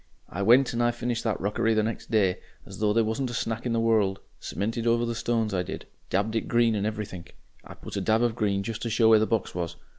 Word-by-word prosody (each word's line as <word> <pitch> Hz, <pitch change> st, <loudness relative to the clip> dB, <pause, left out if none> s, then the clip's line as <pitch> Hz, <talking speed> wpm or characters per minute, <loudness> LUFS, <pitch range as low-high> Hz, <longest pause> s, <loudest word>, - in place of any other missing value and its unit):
I 100 Hz, -, -5 dB
went 125 Hz, +6 st, +5 dB
and 120 Hz, -, 0 dB
I 120 Hz, -, +3 dB
finished 120 Hz, 0 st, -2 dB
that 110 Hz, -3 st, 0 dB
rockery 105 Hz, +3 st, 0 dB
next 110 Hz, +1 st, -2 dB
day, 100 Hz, -5 st, +2 dB, 0.3 s
as -, -, -10 dB
though 105 Hz, -1 st, +2 dB
there 115 Hz, +2 st, +3 dB
wasn't 110 Hz, +4 st, -2 dB
a 120 Hz, -, -5 dB
Snack 115 Hz, +1 st, -2 dB
in 120 Hz, -, -1 dB
the 115 Hz, -, +1 dB
world; 110 Hz, -4 st, +2 dB, 0.2 s
cemented 115 Hz, +4 st, -3 dB
over 120 Hz, 0 st, +2 dB
the 115 Hz, -, -2 dB
stones, 115 Hz, -2 st, -1 dB
I 90 Hz, -, +1 dB
did, 95 Hz, +2 st, -6 dB, 0.2 s
dabbed 105 Hz, +4 st, 0 dB
it 110 Hz, -, -1 dB
green 120 Hz, -1 st, +3 dB
and 105 Hz, 0 st, -1 dB
everythink. 105 Hz, -5 st, -6 dB, 0.3 s
I -, -, -11 dB
put -, -, -9 dB
a 100 Hz, -, -1 dB
dab 110 Hz, +4 st, +2 dB
of 120 Hz, -2 st, +1 dB
green 100 Hz, -4 st, 0 dB
just 115 Hz, +1 st, -5 dB
to 115 Hz, -, -2 dB
show 110 Hz, 0 st, +4 dB
where 110 Hz, -1 st, +7 dB
the 110 Hz, -, +1 dB
box 115 Hz, -4 st, -1 dB
was. 85 Hz, -1 st, -4 dB
110 Hz, 250 wpm, -26 LUFS, 100-115 Hz, 0.3 s, where